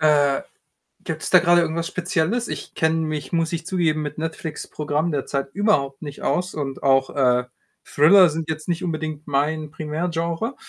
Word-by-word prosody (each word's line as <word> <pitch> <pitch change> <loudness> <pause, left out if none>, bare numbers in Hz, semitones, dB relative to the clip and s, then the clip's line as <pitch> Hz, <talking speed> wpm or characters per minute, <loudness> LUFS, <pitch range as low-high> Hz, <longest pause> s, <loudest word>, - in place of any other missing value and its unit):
Äh, 145 -3 +3 0.7
gibt's - - -4
da - - +7
grade 175 0 +4
irgendwas 165 0 -1
Spezielles? 180 +6 -1
Ich - - -6
kenne 160 0 +2
mich, 155 -2 -3
muss 165 0 0
ich 165 0 -3
zugeben, 165 -5 0
mit 150 0 -5
Netflix' 160 0 -5
Programm 150 +2 -1
derzeit 135 0 -2
überhaupt 145 -10 +1
nicht 145 -2 -8
aus 180 +1 0
und 140 -3 -4
auch, 135 -1 +3
äh, 125 -2 +3 0.4
Thriller 175 +5 +6
sind 160 +1 -4
jetzt 155 +1 -4
nicht 170 -1 -1
unbedingt 155 -3 -4
mein 150 +2 -1
Primärgenre. 165 - -3
155 Hz, 165 wpm, -22 LUFS, 145-170 Hz, 0.7 s, da